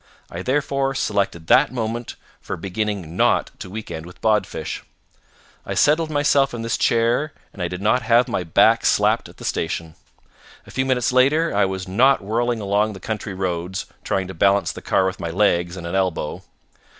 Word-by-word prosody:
I 85 Hz, -, -5 dB
therefore 135 Hz, +2 st, 0 dB
selected 100 Hz, -9 st, -1 dB
that 135 Hz, -, +4 dB
moment 120 Hz, -1 st, -4 dB, 0.3 s
for 95 Hz, -, -5 dB
beginning 95 Hz, -2 st, -3 dB
not -, -, +2 dB
to -, -, -7 dB
weekend 90 Hz, -5 st, -7 dB
with 90 Hz, -, -14 dB
Bodfish. 110 Hz, -2 st, -1 dB, 0.8 s
I -, -, -4 dB
settled 155 Hz, +2 st, +3 dB
myself 145 Hz, -3 st, +2 dB
in 115 Hz, -, -5 dB
this 115 Hz, -, 0 dB
chair 120 Hz, +6 st, +1 dB, 0.2 s
and 100 Hz, -, -9 dB
I 90 Hz, -, 0 dB
did 90 Hz, +2 st, -6 dB
not 115 Hz, +4 st, +3 dB
have 120 Hz, +2 st, +3 dB
my 115 Hz, -7 st, -2 dB
back 80 Hz, -, +4 dB
slapped -, -, +2 dB
at -, -, -17 dB
the -, -, -9 dB
station. 80 Hz, -1 st, -2 dB, 0.7 s
A -, -, -13 dB
few 130 Hz, 0 st, -1 dB
minutes 125 Hz, -2 st, +1 dB
later 140 Hz, +6 st, +3 dB
I -, -, +4 dB
was 95 Hz, 0 st, -4 dB
not 120 Hz, +5 st, +3 dB
whirling 115 Hz, +2 st, -1 dB
along 105 Hz, +2 st, +1 dB
the 95 Hz, -, -9 dB
country 105 Hz, -2 st, -4 dB
roads, 90 Hz, 0 st, -3 dB, 0.2 s
trying 95 Hz, -1 st, -1 dB
to 95 Hz, -, -7 dB
balance 100 Hz, +4 st, +2 dB
the -, -, -9 dB
car 95 Hz, -, +2 dB
with 95 Hz, 0 st, -2 dB
my 85 Hz, -, -3 dB
legs 85 Hz, -1 st, +1 dB
and 85 Hz, -, -7 dB
an 85 Hz, -, -5 dB
elbow. 95 Hz, -5 st, -1 dB
105 Hz, 185 wpm, -22 LUFS, 95-125 Hz, 0.8 s, that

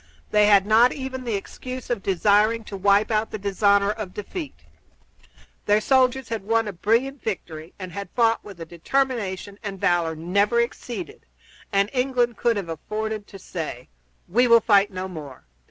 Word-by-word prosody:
They 210 Hz, 0 st, +5 dB
had 200 Hz, -2 st, +5 dB
not 225 Hz, +4 st, +5 dB
even 260 Hz, -2 st, -6 dB
the 230 Hz, -3 st, -1 dB
excuse 255 Hz, +5 st, -7 dB
of 235 Hz, -5 st, -1 dB
desiring 210 Hz, +4 st, +2 dB
to 205 Hz, -, -8 dB
wipe 200 Hz, +3 st, +3 dB
out 215 Hz, 0 st, +1 dB
the -, -, -5 dB
dishonor 200 Hz, 0 st, +2 dB
of 215 Hz, -3 st, -5 dB
a -, -, -21 dB
defeat. 150 Hz, -, -7 dB, 1.1 s
Their 210 Hz, +1 st, +4 dB
soldiers 260 Hz, +1 st, +2 dB
had 225 Hz, -3 st, -3 dB
won 225 Hz, +1 st, +1 dB
a 205 Hz, -, -4 dB
brilliant 235 Hz, +9 st, 0 dB
victory 165 Hz, -6 st, -6 dB
and 185 Hz, -2 st, -7 dB
had 200 Hz, +2 st, -6 dB
fought 230 Hz, -2 st, +2 dB
with 200 Hz, -4 st, -11 dB
a 165 Hz, -, -6 dB
determination 200 Hz, +1 st, -2 dB
and 200 Hz, -2 st, -6 dB
valor 175 Hz, -4 st, +1 dB
never 200 Hz, +8 st, +1 dB
exceeded, 255 Hz, -, -4 dB, 0.4 s
and 200 Hz, -1 st, +2 dB
England 250 Hz, -2 st, +1 dB
could 235 Hz, -2 st, +1 dB
have 190 Hz, -4 st, -4 dB
afforded 215 Hz, +5 st, -4 dB
to 195 Hz, -, -11 dB
say, 160 Hz, -9 st, -6 dB, 0.4 s
"We 245 Hz, +7 st, +3 dB
will 235 Hz, -1 st, +7 dB
fight 205 Hz, -3 st, +4 dB
no 185 Hz, -1 st, -5 dB
more. 150 Hz, -7 st, -9 dB
210 Hz, 170 wpm, -24 LUFS, 190-235 Hz, 1.1 s, will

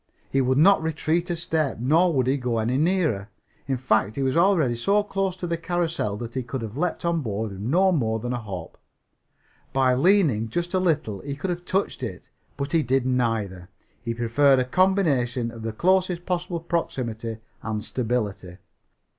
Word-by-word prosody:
He 135 Hz, -, +2 dB
would 130 Hz, +1 st, +2 dB
not 190 Hz, +6 st, +6 dB
retreat 160 Hz, +2 st, -1 dB
a 175 Hz, -, 0 dB
step, 160 Hz, -4 st, -1 dB
nor 160 Hz, +9 st, +3 dB
would 130 Hz, -5 st, +1 dB
he 135 Hz, +2 st, +2 dB
go 125 Hz, -2 st, -1 dB
any 115 Hz, +3 st, 0 dB
nearer. 155 Hz, -, +1 dB, 0.4 s
In 135 Hz, -1 st, 0 dB
fact, 110 Hz, -4 st, +1 dB
he 135 Hz, -, -1 dB
was 130 Hz, +1 st, 0 dB
already 170 Hz, -8 st, +3 dB
so 200 Hz, -, +2 dB
close 195 Hz, -2 st, -2 dB
to 185 Hz, -, -5 dB
the 170 Hz, -1 st, -1 dB
carrousel 165 Hz, -, -1 dB
that 115 Hz, +1 st, -6 dB
he 130 Hz, -, -1 dB
could 125 Hz, 0 st, -5 dB
have 110 Hz, 0 st, -6 dB
leaped 175 Hz, +3 st, -2 dB
on 170 Hz, -1 st, +1 dB
board 110 Hz, -3 st, -3 dB
with 95 Hz, 0 st, -8 dB
no 180 Hz, -, +3 dB
more 115 Hz, -10 st, +1 dB
than 120 Hz, +3 st, -3 dB
a 120 Hz, -, -2 dB
hop. 95 Hz, -6 st, -8 dB, 0.9 s
By 130 Hz, -1 st, +3 dB
leaning 140 Hz, -, +3 dB
just 175 Hz, -, -2 dB
a 185 Hz, -, +3 dB
little 155 Hz, -, 0 dB
he 140 Hz, +4 st, -5 dB
could 180 Hz, +6 st, -3 dB
have 175 Hz, 0 st, -5 dB
touched 195 Hz, +2 st, -1 dB
it. -, -, -6 dB, 0.3 s
But 140 Hz, +1 st, -3 dB
he 165 Hz, -, +3 dB
did 130 Hz, -1 st, +1 dB
neither. 110 Hz, -8 st, -1 dB, 0.3 s
He 115 Hz, -1 st, -3 dB
preferred 130 Hz, +4 st, +3 dB
a 130 Hz, -, +1 dB
combination 135 Hz, -9 st, +1 dB
of 115 Hz, -1 st, -10 dB
the 115 Hz, 0 st, -3 dB
closest 180 Hz, -, +1 dB
possible 180 Hz, -2 st, -2 dB
proximity 120 Hz, -10 st, -3 dB, 0.2 s
and 110 Hz, -1 st, -3 dB
stability. 110 Hz, -7 st, -2 dB
135 Hz, 190 wpm, -25 LUFS, 115-170 Hz, 0.9 s, not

